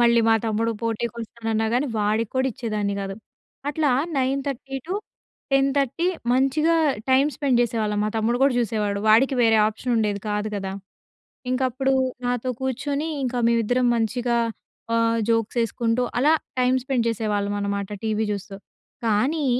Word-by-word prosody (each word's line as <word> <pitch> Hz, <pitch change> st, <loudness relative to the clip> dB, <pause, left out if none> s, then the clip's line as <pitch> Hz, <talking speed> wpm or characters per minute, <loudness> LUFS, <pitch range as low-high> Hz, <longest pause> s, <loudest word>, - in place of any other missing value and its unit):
మళ్ళీ 235 Hz, 0 st, +5 dB
మా 225 Hz, -, +6 dB
తమ్ముడు 225 Hz, +1 st, 0 dB
పోటీకి 230 Hz, 0 st, -2 dB
వస్తానన్నా 225 Hz, -1 st, -2 dB
కాని 260 Hz, +4 st, +1 dB
వాడికి 215 Hz, +1 st, 0 dB
కూడా 260 Hz, 0 st, +2 dB
ఇచ్చేదాన్ని 210 Hz, -3 st, -2 dB
కాదు. 195 Hz, 0 st, -4 dB, 0.5 s
అట్లా 295 Hz, 0 st, +1 dB, 0.3 s
9:30-10:30 275 Hz, -, -2 dB, 0.3 s
మంచిగా 275 Hz, +6 st, +3 dB, 0.4 s
టైం 265 Hz, +2 st, +5 dB
స్పెండ్ 270 Hz, -4 st, +2 dB
చేసేవాళ్ళం 215 Hz, -3 st, -1 dB
మా -, -, 0 dB
తమ్ముడు 225 Hz, +2 st, +1 dB
కూడా 275 Hz, -2 st, +4 dB
చూసేవాడు. 210 Hz, -3 st, 0 dB
వాడికి 245 Hz, +5 st, +5 dB
వేరే 225 Hz, -1 st, +5 dB
ఆప్షన్ 230 Hz, +3 st, -3 dB
ఉండేది 210 Hz, -2 st, 0 dB
కాదు 210 Hz, +1 st, -1 dB
కదా! 195 Hz, -1 st, -4 dB, 0.8 s
ఇంక 255 Hz, +1 st, 0 dB
అప్పుడు 265 Hz, +2 st, 0 dB, 0.3 s
నాతో 245 Hz, +1 st, -1 dB
కూర్చొని 280 Hz, +4 st, -2 dB, 0.2 s
ఇంక 255 Hz, -1 st, -2 dB, 0.2 s
మేమిద్దరం 235 Hz, +2 st, +2 dB
మంచిగా 235 Hz, +1 st, 0 dB, 0.6 s
ఆహ్, 230 Hz, 0 st, +2 dB
జోక్స్ 225 Hz, 0 st, +1 dB
వేసుకుంటూ 230 Hz, +1 st, 0 dB, 0.2 s
అలా 285 Hz, +5 st, +4 dB, 0.3 s
టైం 250 Hz, 0 st, +3 dB
స్పెండ్ 255 Hz, -2 st, 0 dB
చేసేవాళ్ళం 210 Hz, -3 st, -1 dB
అనమాట 200 Hz, -1 st, -2 dB, 0.2 s
టీవీ 220 Hz, 0 st, 0 dB
చూస్తూ. 200 Hz, -1 st, -5 dB, 0.5 s
కానీ 260 Hz, +8 st, +1 dB
235 Hz, 135 wpm, -24 LUFS, 215-265 Hz, 0.8 s, మా